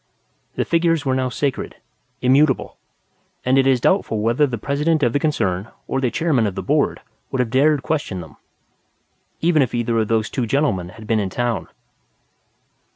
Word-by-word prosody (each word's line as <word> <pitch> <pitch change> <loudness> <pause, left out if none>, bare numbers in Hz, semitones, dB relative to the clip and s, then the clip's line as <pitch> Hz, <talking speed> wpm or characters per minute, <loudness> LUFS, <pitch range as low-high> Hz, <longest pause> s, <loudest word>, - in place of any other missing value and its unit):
The - - 0
figures 165 -3 +1
were 130 - +1
now 130 0 0
sacred; 130 +2 -2 0.5
immutable; 135 +2 +3 0.7
and 130 +2 +4
it 135 - +3
is 130 -2 +4
doubtful 120 - +1
whether 120 +7 +2
the 120 -3 -4
President 150 +6 0
of 120 -2 +2
the 145 - +2
concern 100 - -1 0.2
or 135 - -1
the 125 - +1
Chairman 140 -7 +1
of 95 - -4
the - - -4
Board - - +1 0.3
would 130 - -3
have 120 -3 0
dared 145 +2 +3
question 145 -12 -2
them 80 -4 -11 1.0
even 165 -2 +3
if 125 -3 0
either 115 -1 0
of 110 - 0
those 110 -1 0
two 125 -3 -1
gentlemen 110 - 0
had 110 +3 -12
been 110 0 +1
in 100 -2 -1
town. 120 +3 -2
130 Hz, 175 wpm, -21 LUFS, 115-145 Hz, 1.0 s, and